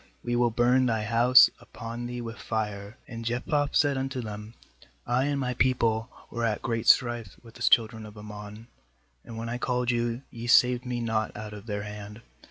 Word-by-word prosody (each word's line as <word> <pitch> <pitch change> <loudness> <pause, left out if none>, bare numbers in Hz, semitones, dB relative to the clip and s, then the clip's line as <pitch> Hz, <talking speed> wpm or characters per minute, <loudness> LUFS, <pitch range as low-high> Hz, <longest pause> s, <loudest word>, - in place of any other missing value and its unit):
we 120 0 -1
will 120 0 +3
burn 125 +2 +3
thy 110 -2 0
house 120 +4 +7
upon 115 +1 -7
thee 120 0 -5
with 115 0 -7
fire/ 105 0 -4
2And 115 -2 -7
Jephthah 125 +5 0
said 140 -2 +2
unto 130 0 -3
them: 105 -1 -7 0.5
'I 125 +2 +1
and 145 -1 0
my 125 -2 -1
people 115 -2 +1 0.2
were 115 - -3
at 110 -2 -1
great 115 -1 -2
strife 120 -5 +3
with 115 -1 -14
the 120 - -14
children 110 -2 +3
of 105 0 -13
Ammon; 105 +1 -9 0.6
and 115 - -9
when 115 +1 -4
I 120 +1 -3
called 125 -1 0
you, 120 +1 -1
ye 115 0 -7
saved 125 0 +4
me 120 -1 -2
not 110 -2 -1
out 105 0 -7
of 105 +2 -10
their 105 -1 -3
hand. 105 +1 -9
115 Hz, 190 wpm, -27 LUFS, 110-125 Hz, 0.6 s, house